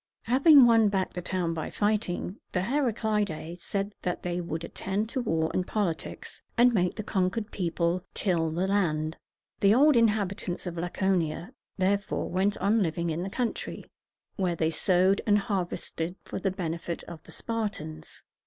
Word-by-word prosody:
Having 275 +3 +7
won 225 -3 +5
back 190 -2 -1
the 180 - -4
town 175 -1 -1
by 160 -2 -4
fighting, 205 -2 -1
the 180 - +1
Heraclidæ 210 - -1
said 200 +2 -3
that 180 - -3
they 175 0 -2
would 165 -1 -4
attend 200 +5 -3
to 260 - -1
war 160 -8 0
and 180 - 0
politics, 185 -7 -3 0.2
and 240 +1 +6
make 180 -4 +1
the 215 - -4
conquered 200 +3 -1
people 170 -1 0
till 170 -5 +1
the 170 +4 -1
ground. 160 -6 0 0.4
The 200 +2 +5
old 290 +2 +6
inhabitants 205 -6 +1
of 175 -2 -4
Laconia, 175 - -1 0.2
therefore, 200 +1 0
went 195 +3 +1
on 210 +4 +2
living 170 -1 0
in 160 +2 -2
the 190 - -3
country, 240 +3 -3 0.5
where 185 -4 0
they 160 0 +1
sowed 185 +4 +3
and 205 -1 +5
harvested 180 -4 -3
for - - -5
the 195 - 0
benefit 170 -2 -4
of 165 -3 -9
the 160 - -15
Spartans. 160 -8 -4
185 Hz, 160 wpm, -28 LUFS, 170-210 Hz, 0.5 s, Having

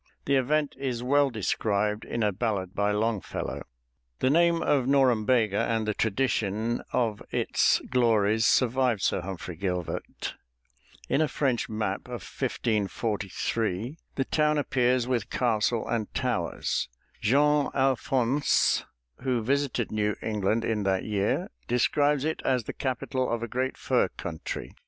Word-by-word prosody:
The 140 - +2
event 145 +3 +1
is 125 -3 -2
well 140 +2 +3
described 105 -1 -1
in 115 - -2
a 105 - +2
ballad 95 -3 -2
by 100 0 +1
Longfellow. 105 0 -2 0.6
The 130 - +2
name 170 +1 +3
of 135 -4 +2
Norumbega 125 -5 +3
and 115 -2 0
the 105 - +1
tradition 110 0 0
of 110 -4 0
its - - +2
glories 110 -3 +3
survived 125 -4 +2
Sir - - +1
Humphrey 90 -1 -6
Gilbert. 90 -1 -4 0.7
In 140 - +2
a 155 - +3
French 130 -5 0
map 110 0 -2
of - - -6
1543, 110 - -2 0.2
the 135 - 0
town 150 0 +2
appears 125 -3 +1
with 120 -5 -1
castle 115 -1 +1
and 115 -3 -2
towers. 120 - -1 0.3
Jean 145 +5 +3
Allfonsce, 135 0 +2 0.3
who 125 -4 -1
visited 135 -2 0
New 105 -1 0
England 110 +1 0
in 110 -2 0
that 95 -1 +1
year, 100 -2 -1 0.2
describes 145 +4 +2
it 160 - -2
as 130 -3 +1
the - - -6
capital 130 0 -2
of 115 0 -1
a - - -2
great 130 +3 -2
fur - - +2
country. 80 -2 -6
115 Hz, 135 wpm, -27 LUFS, 105-130 Hz, 0.7 s, well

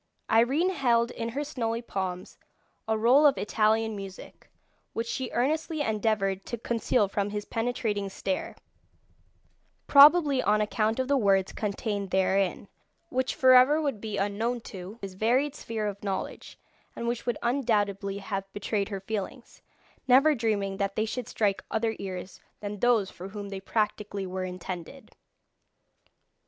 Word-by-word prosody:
Irene 270 +11 +3
held 240 -7 +2
in 230 -1 -4
her 280 +5 -3
snowy 235 -5 -3
palms 185 -4 -5 0.5
a 220 0 +1
roll 255 +7 +6
of 275 - +2
Italian 220 +1 +1
music, 195 -1 -10 0.4
which 230 - -2
she 240 +2 -3
earnestly 310 +5 -1
endeavoured 210 -5 0
to 235 - -3
conceal 230 -1 +1
from 200 +1 -2
his 205 0 -4
penetrating 225 -4 -2
stare, 285 - -3 1.3
probably 285 -1 +7
on 210 - +2
account 215 +2 0
of 260 - 0
the 280 0 +3
words 195 -5 +2
contained 205 -1 -3
therein, 190 +1 +1 0.4
which 260 0 -1
for 260 -1 +6
ever 255 +5 +6
would 280 -9 -2
be 215 -2 -4
unknown 220 +5 -1
to 190 +1 -9
his 195 -1 -5
varied 250 +8 +1
sphere 225 -6 -4
of 200 -1 -4
knowledge, 195 -2 -4 0.4
and 235 - -4
which 240 0 -3
would 240 - 0
undoubtedly 205 -6 0
have 195 -1 -5
betrayed 205 0 -2
her 195 -2 -5
feelings, 220 +5 -6 0.5
never 275 +5 +6
dreaming 210 -6 -1
that 200 0 -1
they 215 - +1
should 240 +1 -4
strike 205 -3 0
other 220 0 0
ears 185 -1 -6 0.2
than 205 0 -6
those 230 -4 +2
for 185 - -9
whom 205 0 -7
they 195 -1 -5
practically 205 -1 -2
were 185 0 -4
intended. 180 +7 -7
220 Hz, 145 wpm, -28 LUFS, 200-245 Hz, 1.3 s, probably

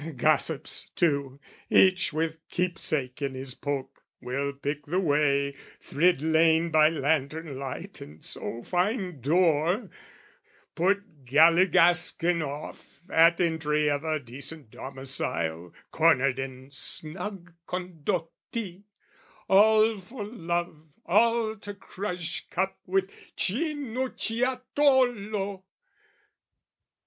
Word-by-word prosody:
Gossips, 155 +2 +1
too, 140 -5 0 0.3
each 185 -1 +4
with 160 +1 -2
keepsake 155 -7 -1
in 135 -2 -2
his 130 0 -5
poke, 140 -1 -5 0.2
Will 135 +3 -3
pick 140 +1 -5
the 180 +5 0
way, 145 -4 +1 0.2
thrid 165 -1 +1
lane 160 +1 +3
by 155 -1 +6
lantern 150 -1 -1
light, 135 -1 -6
And 75 +2 -9
so 120 +1 -2
find 180 - -1
door, 165 - +2 0.8
put 180 -5 -1
galligaskin 170 +3 +4
off 145 0 -8
At 165 +1 +5
entry 150 -3 +1
of 145 +1 -2
a 155 -1 -1
decent 140 +1 -8
domicile 90 -11 -3 0.2
Cornered 140 -5 +3
in 130 0 -7
snug 175 +5 -1
Condotti, 180 +3 -5 0.6
all 215 +2 +5
for 210 +4 -8
love, 175 -6 -4 0.2
All 230 -1 +2
to 205 0 -8
crush 180 -3 -5
cup 190 +2 -2
with 190 +1 0 0.3
Cinucciatolo! 250 - 0
165 Hz, 95 wpm, -27 LUFS, 140-190 Hz, 0.8 s, by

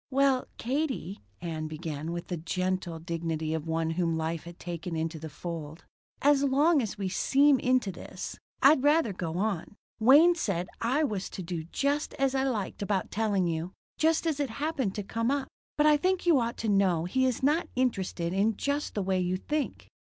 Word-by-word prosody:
"Well, 270 -1 +2
Katie," 255 - -2 0.2
Ann 160 -2 -3
began, 155 0 -5
with 170 0 -5
the 175 - -2
gentle 185 +1 -2
dignity 165 -1 -3
of 160 0 -3
one 160 0 0
whom 165 -1 0
life 160 0 -3
has 170 0 -9
taken 175 0 -5
into 160 0 -2
the 160 +1 -7
fold, 160 0 -7 0.4
"as 285 -1 +5
long 285 +3 +4
as 215 -3 -4
we 195 -2 -2
seem 275 +8 +4
into 255 -6 +2
this, 170 - -7 0.3
I'd 275 0 +7
rather 295 -5 +3
go 170 -2 -4
on. 200 -1 -2 0.2
Wayne 290 +10 +7
said 190 - -2
I 260 +7 +2
was 205 -9 -2
to 185 - -6
do 170 -2 -4
just 280 - -1
as 270 -1 +1
I 265 0 +1
liked 220 -8 -2
about 200 -2 -1
telling 205 -4 +1
you. 170 +2 -2 0.3
Just 320 +1 +3
as 310 -3 0
it 285 -3 0
happened 270 -4 -2
to 205 - -3
come 230 +4 -1
up. 280 -1 0 0.3
But 295 - +4
I 300 -1 +6
think 370 +4 0
you 330 -6 +5
ought 235 0 -2
to 225 - -3
know 190 -5 +3
he 260 +8 +2
is 255 0 -2
not 300 +5 +2
interested 190 -8 -1
in 205 +2 +1
just 285 +1 -2
the 205 - 0
way 190 0 +1
you 180 0 0
think." 295 +9 -3
200 Hz, 195 wpm, -29 LUFS, 170-275 Hz, 0.4 s, I'd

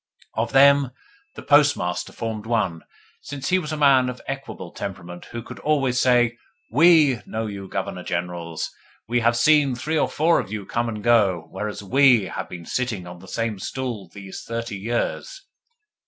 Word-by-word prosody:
Of 115 +1 -1
them 140 0 +6 0.5
the - - -9
Postmaster 145 -12 +2
formed 110 -1 -5
one, 105 -8 0 0.4
since 140 -2 -5
he 185 0 +3
was 155 -3 -5
a 155 - -2
man 135 -3 +5
of 125 - -6
equable 135 -10 -6
temperament 90 -3 -7
who 120 -1 -7
could - - -10
always 135 -5 +1
say: 120 -2 +3 0.3
"WE 160 -7 +5
know 110 +1 -3
you, 100 -2 -6
Governor - - -4
Generals! 85 -2 -4 0.4
We 120 +2 +1
have 120 0 +2
seen 145 0 +4
three 155 +6 -1
or - - +1
four 165 +2 +3
of - - -5
you 105 -2 -4
come 120 +3 -1
and 105 -2 -6
go, 100 -8 +3
whereas 105 +1 -5
WE 130 +1 +5
have - - -5
been 85 -2 -8
sitting 115 -6 -2
on 90 0 -10
the 95 - -14
same 115 -1 -3
stools 115 -6 -5
these 95 -2 -8
thirty 115 -1 -4
years." 120 - -3
115 Hz, 170 wpm, -23 LUFS, 100-135 Hz, 0.5 s, them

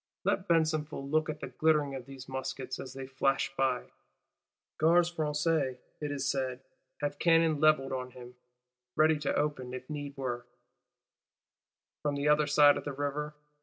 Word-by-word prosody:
Let 195 - 0
Besenval 155 -4 +1
look 155 0 +2
at 150 0 -5
the - - -5
glitter 150 -3 +2
of 130 -2 -7
these 135 -1 -10
muskets, 130 -1 -4
as 130 0 -8
they 135 0 -5
flash 135 +1 0
by! 130 -2 0 0.9
Gardes 170 +2 +4
Françaises, 150 -3 0 0.2
it 150 -1 -3
is 140 -1 -2
said, 130 -2 -1 0.4
have 145 0 -2
cannon 165 -3 +4
levelled 155 -3 +4
on 130 -1 -3
him; 125 0 -12 0.6
ready 155 0 +4
to 145 - -1
open, 130 -4 -1
if 130 0 -8
need 145 -2 -5
were, 120 -2 -3 1.5
from 145 -1 -1
the 140 +1 -1
other 150 0 +4
side 145 0 +6
of - - -5
the 145 - -4
River. 145 +2 -3
145 Hz, 160 wpm, -31 LUFS, 130-155 Hz, 1.5 s, side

